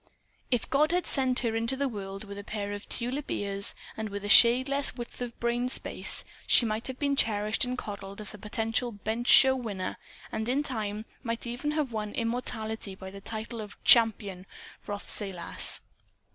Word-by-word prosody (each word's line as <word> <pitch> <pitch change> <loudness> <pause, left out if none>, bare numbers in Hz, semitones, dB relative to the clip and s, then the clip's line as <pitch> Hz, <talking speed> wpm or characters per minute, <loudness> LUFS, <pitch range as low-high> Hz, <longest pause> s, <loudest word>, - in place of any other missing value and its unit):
If 245 -3 0
God 300 +3 +3
had 355 0 +1
sent 260 -2 +1
her 230 -2 0
into 230 +4 0
the 280 0 +1
world 195 -4 -6
with 200 -1 -8
a - - -7
pair 205 -1 -4
of 205 0 -7
tulip 255 +4 -1
ears 200 0 0 0.2
and 220 -1 -4
with 200 0 -5
a - - -3
shade 240 +5 +7
less 275 -1 0
width 240 +1 -8
of 240 -1 -5
brain 240 +1 0
space - - 0 0.2
she 240 - +6
might 220 +1 -2
have 260 -1 -5
been 280 0 +1
cherished 215 -2 +2
and 250 0 -3
coddled 200 -3 -7
as 210 -1 -5
a 210 - -10
potential 225 +3 -1
bench 220 +3 -3
show 265 0 +8
winner, 205 -7 -4 0.3
and 220 +2 -2
in 275 +4 +2
time 215 -5 -3 0.2
might 230 -2 -3
even 245 +5 -3
have 300 -5 -1
won 210 -2 -3
immortality 220 -3 -2
by 190 0 -9
the 200 0 -10
title 220 +2 -5
of 210 -1 -9
"CHAMPION 205 -5 +5 0.4
Rothsay 205 0 -1
Lass." 170 -2 -4
225 Hz, 185 wpm, -29 LUFS, 205-250 Hz, 0.4 s, show